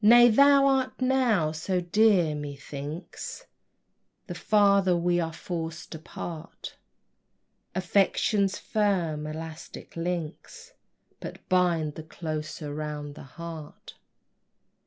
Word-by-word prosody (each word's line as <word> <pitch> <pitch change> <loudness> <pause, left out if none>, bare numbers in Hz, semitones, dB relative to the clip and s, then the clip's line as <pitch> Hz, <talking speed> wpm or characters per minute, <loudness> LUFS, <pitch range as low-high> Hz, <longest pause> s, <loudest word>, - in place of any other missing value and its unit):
Nay, 240 +3 +8
thou 280 +4 +6
art 265 -1 +1
now 250 -11 +2
so 170 +4 -1
dear, 180 -2 +3
methinks 145 +2 -7 0.8
The - - -6
farther 200 -3 +3
we 175 +1 +2
are 165 -1 -1
forced 165 0 -5
apart, 160 0 -8 1.0
Affection's 195 +2 +2
firm 175 -8 0
elastic 160 +1 -8
links 170 - -5 0.5
But - - -9
bind 170 -4 +2
the 160 - -7
closer 155 -1 -5
round 150 -1 -5
the 155 - -11 0.2
heart. 165 -3 -8
170 Hz, 95 wpm, -27 LUFS, 155-200 Hz, 1.0 s, Nay